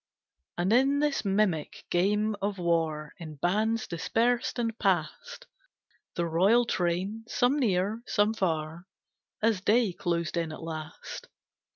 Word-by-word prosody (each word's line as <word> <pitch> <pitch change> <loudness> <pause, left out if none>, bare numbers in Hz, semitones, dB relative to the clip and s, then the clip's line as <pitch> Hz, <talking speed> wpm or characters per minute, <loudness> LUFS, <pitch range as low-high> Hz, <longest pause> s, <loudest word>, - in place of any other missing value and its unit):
And 180 +5 +1
in 270 +3 +4
this 295 -1 +1
mimic 195 -6 0
game 210 +4 +2
of 200 0 -1
war 165 -3 0
In 155 -3 -8
bands 215 +9 0
dispersed 230 +10 0
and 230 -2 -1
past 350 - -1 0.7
The 175 - 0
royal 195 +9 +4
train, 190 +2 -1
some 250 +5 +2
near, 205 -1 +1
some 210 -1 +2
far, 165 -3 -2 0.6
As 220 -4 +2
day 215 -1 +3
closed 170 -2 -2
in 165 -2 -1
at 155 - -8
last. 155 -1 -7
195 Hz, 130 wpm, -28 LUFS, 170-225 Hz, 0.7 s, in